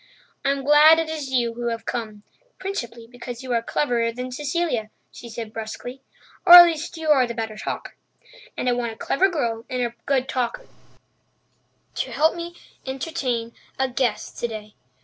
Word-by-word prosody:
"I'm 275 -1 0
glad 300 +3 +7
it 325 -1 -1
is 305 -4 -4
you 240 -3 +1
who 240 +1 -4
have 230 -1 -3
come—principally 235 - -6
because 245 +1 -9
you 255 -2 -3
are 230 - +2
cleverer 235 -2 0
than 250 +2 -6
Cecilia," 285 -5 -2 0.2
she 235 - -11
said 225 -1 -7
brusquely. 230 +4 -7 0.4
"Or 350 - +8
at 350 0 +13
least 335 0 -3
you 320 -1 -3
are 265 -4 +5
the 235 - -5
better 220 -1 -4
talker. - - -5 0.6
And - - -2
I - - +4
want 240 -2 -1
a - - -16
clever 385 +8 +2
girl 235 -10 -2
and 255 -1 -1
a 235 -1 -2
good 265 -2 +1
talker 255 - -2 1.3
to - - -3
help 315 +3 +2
me 340 0 -6 0.3
entertain 265 -4 -3 0.2
a 265 - +1
guest 245 -3 -2
today. 215 -3 -5
250 Hz, 170 wpm, -23 LUFS, 230-300 Hz, 1.3 s, at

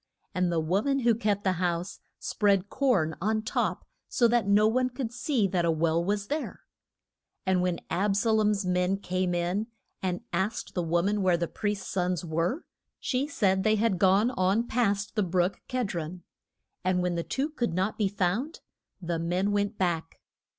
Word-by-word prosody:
And 180 -1 +1
the 170 - +1
wo 175 +6 +1
man 275 +1 0
who 235 -1 +4
kept 205 -2 0
the 190 - +2
house 175 +1 -1 0.2
spread 200 -2 +1
corn 205 - +2
on 215 +2 0
top - - -1 0.2
so 240 - +3
that 235 -3 +2
no 205 +1 +5
one 255 +3 +2
could 245 -2 -5
see 245 -4 +1
that 180 -2 +1
a 170 - +2
well 165 +1 +2
was 200 +2 -1
there. 295 +6 -4 0.8
And 185 -1 +2
when 180 -1 -1
Ab 195 +2 +1
sa 220 +3 +2
lom's 210 -2 +2
men 180 +1 +1
came 185 -2 -1
in 180 +5 -1 0.3
and 180 -1 -2
asked 195 +7 -2
the 180 - 0
wo 170 +1 +1
man 205 +1 +1
where 180 -2 +3
the 170 0 -1
priest's 205 0 -3
sons 180 -2 -1
were, 170 - -1 0.3
she 265 +2 -1
said 190 -9 +1
they 215 0 +4
had 215 -4 +1
gone 195 +5 +4
on 195 +2 +1
past 205 -4 0
the 215 - +1
brook 180 0 0
Ked 250 -6 -1
ron. 170 +1 -5 0.6
And 180 0 +1
when 180 -1 0
the 170 - -1
two 270 - -2
could 240 - -2
not 190 +5 -1
be 205 - +3
found 205 - -1 0.4
the 170 -2 -2
men 180 +4 0
went 205 +1 0
back. 170 -3 -1
195 Hz, 185 wpm, -28 LUFS, 180-220 Hz, 0.8 s, no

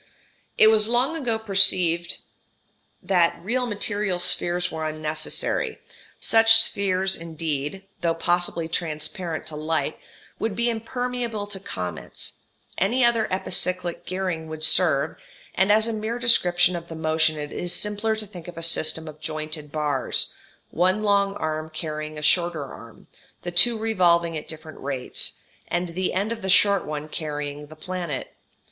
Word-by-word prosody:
It 220 - +8
was 215 -1 +3
long 250 +7 +2
ago 245 -8 0
perceived 185 -5 +4 0.8
that 175 -3 +2
real 250 +5 0
material 205 -3 -1
spheres 175 0 +2
were 160 -1 -4
unnecessary; 155 0 -1 0.4
such 225 0 +6
spheres 190 -3 +1
indeed, 160 +1 -4 0.2
though 165 -1 +1
possibly 175 0 0
transparent 165 +1 -3
to 155 - -7
light, 155 +1 -2 0.4
would 220 -3 -2
be 235 +2 +1
impermeable 235 -1 -3
to 205 -1 -8
comets: 90 - -5 0.5
any 240 +7 +3
other 230 -2 +2
epicyclic 180 -1 -1
gearing 180 -3 -3
would 155 0 -7
serve, 160 -4 +3 0.4
and 190 +2 +2
as 215 +2 +4
a 230 - -2
mere 220 +2 -3
description 180 -7 +4
of 170 -1 -6
the 165 - -8
motion 160 0 +1
it 150 -1 -6
is 175 - -3
simpler 210 +4 0
to 215 0 -5
think 180 -5 -11
of 175 -2 -10
a 165 - -5
system 160 -1 +2
of 155 0 -10
jointed 155 -1 -5
bars, 145 -4 0 0.4
one 185 +5 +1
long 200 -1 +2
arm 155 -1 -3
carrying 155 -1 -5
a 150 - -7
shorter 170 -2 +1
arm, - - -13 0.4
the 175 - -4
two 225 +7 +6
revolving 175 -6 +2
at 150 - -6
different 155 0 -7
rates, 135 -2 -2 0.3
and 175 0 -2
the 185 +2 -2
end 200 +4 -1
of 230 -1 -4
the 190 - -4
short 200 0 +4
one 150 0 -5
carrying 150 -1 -5
the 155 - -13
planet. 170 -3 -5
175 Hz, 150 wpm, -24 LUFS, 155-205 Hz, 0.8 s, It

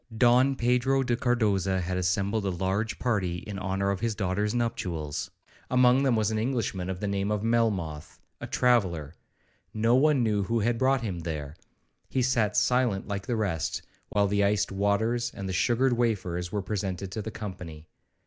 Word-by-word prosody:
Don 125 +3 +4
Pedro 125 +2 +2
de 120 -2 0
Cardoza 105 -7 +1
had 90 +1 -2
assembled 95 +4 0
a - - +1
large 95 +5 -1
party 100 -8 0
in 100 -2 -5
honour 95 +1 -1
of 100 - -2
his 115 0 -1
daughter's 100 +3 -1
nuptials; 90 -11 -2 0.4
among 125 +1 +4
them 135 -4 +3
was 110 -1 +1
an 110 - 0
Englishman 110 -7 -2
of 95 -1 -4
the 105 - -2
name 100 0 -1
of 105 -1 -1
Melmoth, 100 -10 -1 0.2
a - - -6
traveller; 90 - +1 0.6
no 115 +2 +2
one 140 0 +4
knew 105 -3 +1
who 115 +4 0
had 115 +2 0
brought 130 0 +3
him 95 -7 -3
there. 75 -3 -5 0.5
He 130 - 0
sat 115 -5 +1
silent 125 -6 +2
like 100 -1 -4
the 120 - 0
rest, 100 -7 -2 0.3
while 100 0 +2
the 100 +1 +1
iced 100 0 +1
waters 110 +5 0
and 100 - -5
the 95 - -3
sugared 120 +6 +2
wafers 95 -7 -1
were 105 -2 -2
presented 95 -2 -3
to 110 - -4
the 110 - -5
company. 90 -8 -8
105 Hz, 175 wpm, -27 LUFS, 95-120 Hz, 0.6 s, Don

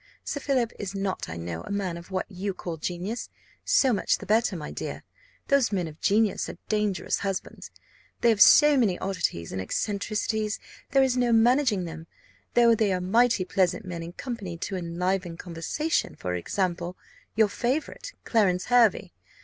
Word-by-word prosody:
Sir 285 - -3
Philip 260 -5 0
is 200 -1 -5
not, 195 -1 -3
I 85 - -5
know, 85 0 -5
a - - -10
man 200 -4 -2
of 170 +1 -10
what 185 -1 -2
you 195 -1 -4
call 170 -3 -5
genius. 180 +8 -4 0.3
So 265 -3 +3
much 200 - +1
the - - -10
better, 215 0 +2
my 155 -3 -6
dear - - -6 0.5
those 280 -5 +3
men 185 -4 -1
of 155 0 -12
genius 210 0 +2
are - - -8
dangerous 210 -3 0
husbands; 195 -2 -4 0.5
they 235 - +5
have 215 -3 +2
so 295 +4 +8
many 205 -8 +2
oddities 180 - -2
and 95 - -3
eccentricities, 210 - -2 0.3
there 270 -1 +4
is 255 -1 +1
no 245 -1 +2
managing 230 -3 +3
them, 165 0 -8 0.5
though 235 -1 +6
they 215 -3 +2
are 185 - 0
mighty 225 +2 +2
pleasant 190 +3 0
men 175 -2 -5
in 170 +1 -7
company 205 -8 -6
to 190 +3 -4
enliven 180 0 -2
conversation; 180 - -2
for 90 - -4
example, 175 - -2 0.4
your 220 -1 +5
favourite, 290 - -3
Clarence 190 -6 +2
Hervey. 230 -5 +4
200 Hz, 170 wpm, -26 LUFS, 180-230 Hz, 0.5 s, so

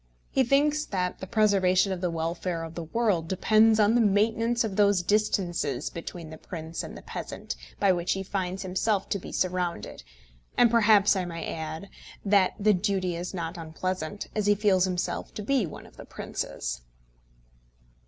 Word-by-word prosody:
He 265 - +3
thinks 290 +4 +2
that 180 -2 -2
the 190 - -7
preservation 195 -3 +3
of 185 -2 -3
the 180 - 0
welfare 165 +1 -2
of 165 0 -7
the 170 -1 -5
world 190 -3 0
depends 215 +4 +4
on 210 +1 +5
the 240 - +4
maintenance 225 +3 +2
of 210 -4 -3
those 200 -3 +3
distances 175 - 0
between 165 -1 -7
the 160 - -10
prince 160 -1 -6
and - - -8
the - - -12
peasant - - -6 0.2
by 195 - +4
which 175 -1 0
he 195 - -3
finds 190 0 -3
himself 190 +2 0
to 200 - -1
be - - -9
surrounded; 180 - -2 0.6
and 240 -2 +5
perhaps, 210 -3 +5
I 185 -2 -1
may 165 -1 -5
add, 160 +3 -5 0.4
that 200 -2 +4
the 210 +1 +4
duty 185 -2 0
is 175 +2 -4
not 170 0 -4
unpleasant, 165 +3 -4
as 210 -1 -1
he 205 - +5
feels 195 -3 +3
himself 180 -1 -3
to 210 - -5
be 255 -4 +1
one - - -10
of - - -18
the - - -10
princes. - - -5
190 Hz, 175 wpm, -27 LUFS, 175-210 Hz, 0.6 s, on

